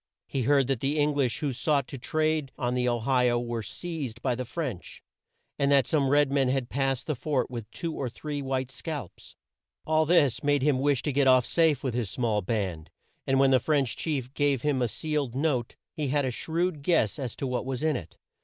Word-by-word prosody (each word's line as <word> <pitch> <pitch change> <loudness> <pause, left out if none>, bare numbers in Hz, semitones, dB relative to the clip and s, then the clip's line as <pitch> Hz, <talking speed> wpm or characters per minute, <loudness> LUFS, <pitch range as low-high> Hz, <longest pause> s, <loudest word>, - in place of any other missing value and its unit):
He 135 - -2
heard 140 +2 +3
that 135 -2 -1
the 140 +4 0
Eng 150 0 +2
lish 125 -6 0
who 145 -3 -1
sought 140 +1 +1
to 135 - -7
trade 155 0 0
on 125 -3 -1
the 125 0 +1
O 120 -1 -1
hi 125 0 +3
o 120 - +2
were 120 -1 -3
seized 140 -3 -5
by 130 - +1
the 125 +1 -4
French, 125 - -5 0.6
and 140 0 +2
that 140 -2 +5
some 140 -4 +1
red 145 0 +4
men 135 -2 +2
had 130 -2 -1
passed 135 -1 0
the 155 - -1
fort 130 0 -1
with 115 -4 -6
two 165 +6 -4
or 130 -4 -3
three 145 +4 -5
white 130 -1 -2
scalps. 140 - -7 0.5
All 155 0 +2
this 145 -7 +3
made 145 -2 +2
him 140 -3 +3
wish 140 -1 +1
to 145 - -1
get 140 0 +3
off 130 -2 +6
safe 160 -5 +2
with 130 -4 -1
his 120 -4 -1
small 110 -3 0
band, 95 -6 -3 0.4
and 135 0 +3
when 135 0 +5
the 130 - +5
French 140 -2 +1
chief 135 -5 -3
gave 145 -4 +1
him 145 -3 +1
a 120 - +2
sealed 145 0 -2
note, 135 -5 0 0.2
he 150 -2 -2
had 145 +1 +1
a 130 - -1
shrewd 165 +4 -2
guess 145 - +1
as 125 -5 -4
to - - -4
what 125 -1 -1
was 130 +1 -4
in 155 -1 +2
it. 85 - -7
135 Hz, 225 wpm, -27 LUFS, 125-145 Hz, 0.6 s, off